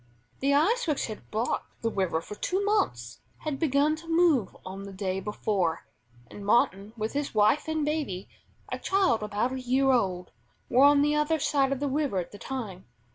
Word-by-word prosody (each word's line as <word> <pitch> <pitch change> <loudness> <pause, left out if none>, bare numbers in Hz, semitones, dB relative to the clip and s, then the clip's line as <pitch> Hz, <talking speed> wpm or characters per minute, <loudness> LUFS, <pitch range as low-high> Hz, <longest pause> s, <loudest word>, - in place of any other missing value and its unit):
The 280 +1 +2
ice 415 +10 +2
which 300 -3 0
had 215 -2 -9
blocked 225 +2 -3
the 230 - +1
river 185 -5 0
for 185 - -9
two 375 - -1
months, 120 - 0 0.2
had 300 -3 -3
begun 300 0 +2
to 330 +1 -13
move 325 - +2
on 190 +1 -7
the 200 0 -8
day 190 0 -2
before, 195 - -1 0.4
and 200 - -11
Martin 200 -1 +2
with 220 0 -3
his 285 -4 -3
wife 215 +9 +3
and 315 -1 0
baby 290 -12 -2 0.4
a - - -3
child 380 - +2
about 210 +4 -1
a 260 - -4
year 265 +2 +2
old 185 -8 0 0.4
were 260 +3 +6
on 285 0 +6
the 295 +1 +2
other 300 +2 +2
side 275 -2 +1
of 275 - -1
the 285 - -1
river 280 -6 0
at 180 - -3
the 205 - -11
time. 220 -9 -6
255 Hz, 190 wpm, -28 LUFS, 200-295 Hz, 0.4 s, were